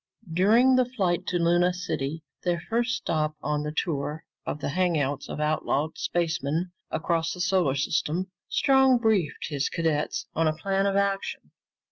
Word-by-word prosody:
During 230 Hz, +9 st, +5 dB
the 255 Hz, -, +4 dB
flight 185 Hz, -8 st, -1 dB
to 180 Hz, -, +1 dB
Luna 175 Hz, +1 st, +3 dB
City, 160 Hz, -4 st, -3 dB, 0.2 s
their 175 Hz, -1 st, +1 dB
first 235 Hz, +7 st, 0 dB
stop 155 Hz, -8 st, -1 dB
on 150 Hz, +1 st, 0 dB
the 150 Hz, 0 st, -3 dB
tour 150 Hz, -1 st, -2 dB, 0.2 s
of 150 Hz, -, -3 dB
the -, -, -3 dB
hangouts 150 Hz, -5 st, 0 dB
of -, -, -5 dB
outlawed 150 Hz, 0 st, 0 dB
spacemen 165 Hz, 0 st, -1 dB, 0.2 s
across 165 Hz, 0 st, 0 dB
the 180 Hz, -, -9 dB
solar 180 Hz, -6 st, +2 dB
system, 155 Hz, +6 st, -1 dB, 0.2 s
Strong 265 Hz, -2 st, +4 dB
briefed 210 Hz, -13 st, 0 dB
his 140 Hz, -3 st, -1 dB
cadets 160 Hz, -3 st, -1 dB
on 165 Hz, 0 st, +2 dB
a 155 Hz, 0 st, 0 dB
plan 195 Hz, +3 st, 0 dB
of 195 Hz, -, 0 dB
action. 200 Hz, 0 st, -1 dB
170 Hz, 155 wpm, -26 LUFS, 155-195 Hz, 0.2 s, During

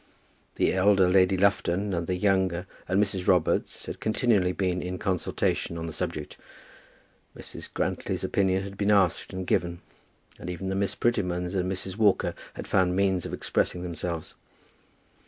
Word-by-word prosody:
The -, -, +2 dB
elder 95 Hz, 0 st, +4 dB
Lady 95 Hz, +1 st, +4 dB
Lufton 100 Hz, 0 st, +1 dB
and 85 Hz, -1 st, -2 dB
the 90 Hz, -, 0 dB
younger, 95 Hz, -2 st, +1 dB, 0.2 s
and 95 Hz, -, +2 dB
Mrs. 95 Hz, -3 st, 0 dB
Robarts 90 Hz, -3 st, +1 dB
had -, -, -6 dB
continually 110 Hz, -4 st, +2 dB
been 90 Hz, -1 st, -1 dB
in 90 Hz, 0 st, -4 dB
consultation 90 Hz, -2 st, -1 dB
on 80 Hz, -, -4 dB
the 80 Hz, -, -5 dB
subject; 75 Hz, 0 st, -4 dB, 1.0 s
Mrs. -, -, -9 dB
Grantly's -, -, -2 dB
opinion 95 Hz, -1 st, +1 dB
had 100 Hz, 0 st, -9 dB
been 100 Hz, 0 st, +1 dB
asked 100 Hz, -5 st, +3 dB
and 95 Hz, 0 st, -4 dB
given; 85 Hz, -1 st, 0 dB, 0.6 s
and -, -, -6 dB
even 90 Hz, +2 st, -4 dB
the 95 Hz, -, -1 dB
Miss 100 Hz, 0 st, 0 dB
Prettymans 90 Hz, -6 st, 0 dB
and 95 Hz, -1 st, 0 dB
Mrs. 95 Hz, 0 st, -4 dB
Walker 105 Hz, -3 st, +3 dB, 0.2 s
had -, -, -6 dB
found 90 Hz, -1 st, +2 dB
means 95 Hz, -2 st, +1 dB
of -, -, -8 dB
expressing 90 Hz, -, -1 dB
themselves. 85 Hz, -1 st, -4 dB
95 Hz, 155 wpm, -27 LUFS, 90-100 Hz, 1.0 s, elder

